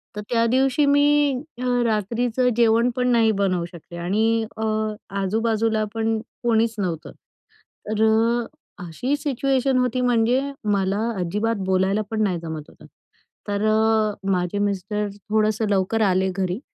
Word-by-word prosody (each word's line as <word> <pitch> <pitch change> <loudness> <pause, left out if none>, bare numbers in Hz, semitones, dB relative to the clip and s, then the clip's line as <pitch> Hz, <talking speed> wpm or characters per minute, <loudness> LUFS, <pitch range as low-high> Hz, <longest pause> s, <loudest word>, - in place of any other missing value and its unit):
तर 210 - -4
त्या 230 -1 +2
दिवशी 265 +4 +2
मी 290 0 +3 0.3
अ, - - -3 0.2
रात्रीचं 230 +3 0
जेवण 230 +1 +4
पण 250 0 0
नाही 225 -2 +4
बनवू 185 -3 +1
शकले. 170 0 -11
आणि 220 +6 +1
अ, 220 - -2 0.6
आजूबाजूला 220 +2 0
पण 225 0 0 0.3
कोणीच 230 -1 +2
नव्हतं. 175 -6 -3 0.8
तर 215 0 +1 0.8
अशी 250 - -2
सिच्युएशन 270 -2 0
होती 250 0 +1
म्हणजे 245 +1 +2 0.3
मला 195 0 0 0.2
अजिबात 210 +6 -1
बोलायला 190 +2 +1
पण 220 -1 -1
नाही 190 -4 0
जमत 160 -2 -7
होतं. - - -17 0.6
तर 205 0 -1 0.7
माझे 180 +1 -1
मिस्टर 205 +1 -1 0.2
थोडंसं 215 0 +1
लवकर 200 +3 +1
आले 190 -2 +2
घरी 185 +1 -2
220 Hz, 130 wpm, -23 LUFS, 195-235 Hz, 0.8 s, जेवण